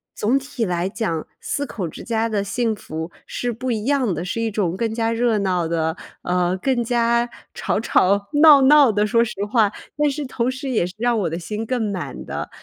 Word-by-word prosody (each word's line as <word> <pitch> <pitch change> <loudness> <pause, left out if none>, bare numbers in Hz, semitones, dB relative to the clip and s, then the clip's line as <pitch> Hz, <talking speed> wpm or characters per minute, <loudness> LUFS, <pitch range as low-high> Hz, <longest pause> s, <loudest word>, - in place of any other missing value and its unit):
总 230 +6 +2
体 275 -3 -4
来 180 -3 0
讲， 195 -6 -3
4 285 - -2
口 200 -9 -5
之 155 - -9
家 225 -1 0
的 210 -2 0
幸 225 +3 0
福 160 -4 -6 0.2
是 245 - -2
不 250 +3 -3
一 220 -2 -2
样 265 -7 +1
的。 170 +1 -3
是 185 +5 -3
一 225 - 0
种 190 -4 -1
更 225 +1 -1
加 225 0 0
热 230 -2 +1
闹 180 -4 0
的， 160 0 -1 0.2
呃， 180 0 0
更 260 -3 +1
加 235 0 +2 0.3
吵 - - -1
吵 200 -2 +2
闹 300 -3 +9
闹 285 0 +7
的， 210 0 +1
说 230 +1 +3
实 235 - -5 0.2
话。 220 -4 +4 0.3
但 295 0 +3
是 295 +2 -4
同 245 -1 -1
时 260 +1 -5
也 225 -9 +1
是 180 - -10
让 240 0 +2
我 205 - 0
的 165 - -2
心 210 +5 -4
更 225 -3 -1
满 185 -3 -5
的， - - -4
225 Hz, 225 characters per minute, -21 LUFS, 190-245 Hz, 0.3 s, 闹